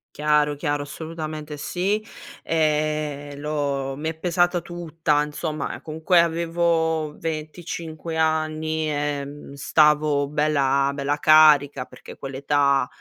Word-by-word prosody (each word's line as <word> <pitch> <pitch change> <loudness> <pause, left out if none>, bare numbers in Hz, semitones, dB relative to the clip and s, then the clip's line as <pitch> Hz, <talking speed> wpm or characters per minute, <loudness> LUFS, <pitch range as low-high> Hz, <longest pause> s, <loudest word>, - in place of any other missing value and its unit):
Chiaro, 150 -1 +2
chiaro, 145 -1 -1
assolutamente 155 0 -6
sì. 195 +8 -1 0.4
Ehm, 150 -2 -1
l'ho 140 -3 -2
mi 160 +2 -2
è - - -6
pesata 175 +1 +1
tutta 165 -3 -1
insomma, 150 0 -4
ehm, - - -8
comunque 160 +3 +2
avevo 165 -2 0
25 160 0 -5
anni, 155 0 0
ehm, 145 -1 -4
stavo 150 0 +3
bella, 140 -2 +2
bella 140 +1 -1
carica 145 -4 +5
perché - - -13
quell'età, 140 0 +1
155 Hz, 105 wpm, -23 LUFS, 145-160 Hz, 0.4 s, carica